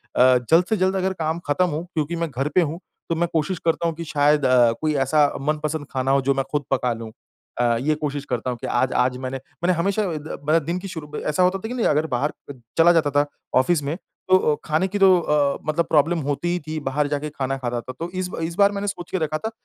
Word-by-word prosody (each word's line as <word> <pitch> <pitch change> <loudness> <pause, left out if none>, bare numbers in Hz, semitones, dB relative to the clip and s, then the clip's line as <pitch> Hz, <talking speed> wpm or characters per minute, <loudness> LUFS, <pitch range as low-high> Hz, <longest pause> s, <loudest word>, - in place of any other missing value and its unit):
अ, 125 0 +6
जल्द 165 +2 +5
से 220 - +2
जल्द 190 +1 +1
अगर 190 0 0
काम 160 +2 -1
ख़त्म 165 +5 +2
हो 155 +3 -3
क्योंकि 160 +1 -1
मैं 170 -1 -2
घर 135 +4 -2
पे 180 - +6
हूँ 165 +2 -2 0.3
तो 165 - +1
मैं 170 +1 +1
कोशिश 160 +3 0
करता 170 0 +1
हूँ 165 - -2
कि 170 - -6
शायद 145 -1 +2
अ, 125 -2 +5
कोई 155 -1 +1
ऐसा 150 0 +4
मनपसंद 155 0 -2
खाना 130 0 0
हो 140 0 +3
जो 135 +1 +2
मैं 135 0 -1
खुद 145 -2 -1
पका 125 -2 +1
लूँ। 115 -1 -8 0.5
अ, 120 -1 +2
ये 155 +2 +1
कोशिश 145 -1 -3
करता 125 -2 -2
हूँ 120 - -3
कि - - -4
आज 130 +1 +1
आज 125 0 +2
मैंने 130 +1 -4 0.3
मैंने 180 +1 +3
हमेशा 200 +5 +1
अ, 180 -4 -2
द 150 +2 -7
मतलब 155 +2 +2
दिन 175 +2 -2
की 195 - -7
शुरू 160 -5 -8
ऐसा 150 +4 +1
होता 185 +2 +2
था 220 - -6
कि 245 - -5
नहीं 245 - -1
अगर 155 +2 +1
बाहर 135 +3 -1 0.2
च - - -7 0.2
चला 165 +1 +7
जाता 155 -3 +2
था 145 +1 +3 0.3
ऑफ़िस 150 +2 +2
में 145 +4 -2 0.3
तो 185 - +7
अ, 150 -5 +1
खाने 160 +4 +1
की 205 +2 -3
तो 190 -2 +6
अ, 150 -3 +1
मतलब 170 +2 +1
प्रॉब्लम 160 +2 +3
होती 145 +5 -1
ही 180 - -1
थी 155 0 -3
बाहर 145 +2 0
जाके 145 +1 -2
खाना 135 -2 -3
खाता 120 -2 -3
था, 130 - -8
तो 170 +1 -4
इस 185 -1 -3
ब - - -6
इस 165 +1 -3
बार 200 0 +5
मैंने 200 0 -3
सोच 175 -3 -5
के 190 - 0
रखा 155 -1 -1
था 220 +7 -4
155 Hz, 265 wpm, -23 LUFS, 140-175 Hz, 0.5 s, चला